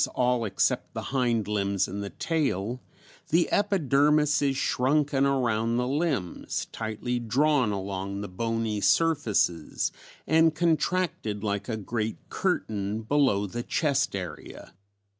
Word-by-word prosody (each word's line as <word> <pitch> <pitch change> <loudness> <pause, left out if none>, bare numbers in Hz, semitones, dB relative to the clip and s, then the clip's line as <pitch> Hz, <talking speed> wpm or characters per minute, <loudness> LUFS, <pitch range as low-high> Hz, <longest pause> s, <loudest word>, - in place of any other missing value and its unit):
_ - - +3
all 125 -2 +2
except 95 -3 0
the - - -5
hind 120 -5 +1
limbs 100 -2 0
and 100 +2 -5
the 100 - -5
tail), 125 - -1 0.5
the 170 +2 +3
epidermis 150 -7 +3
is 135 -2 +1
shrunken 140 +1 +2
around 115 -4 +1
the 125 0 0
limbs, 140 - -2
tightly 115 +2 -3
drawn 130 +1 +2
along 100 0 -4
the 100 - -4
bony 115 +2 -2
surfaces, 110 - +1 0.3
and 160 0 +4
contracted 160 - 0
like 100 +2 -2
a 110 - -1
great 110 +1 -3
curtain 110 - -1
below 120 -5 +2
the 120 +5 -4
chest 140 -2 0
area. 90 -4 -7
120 Hz, 125 wpm, -27 LUFS, 105-145 Hz, 0.5 s, and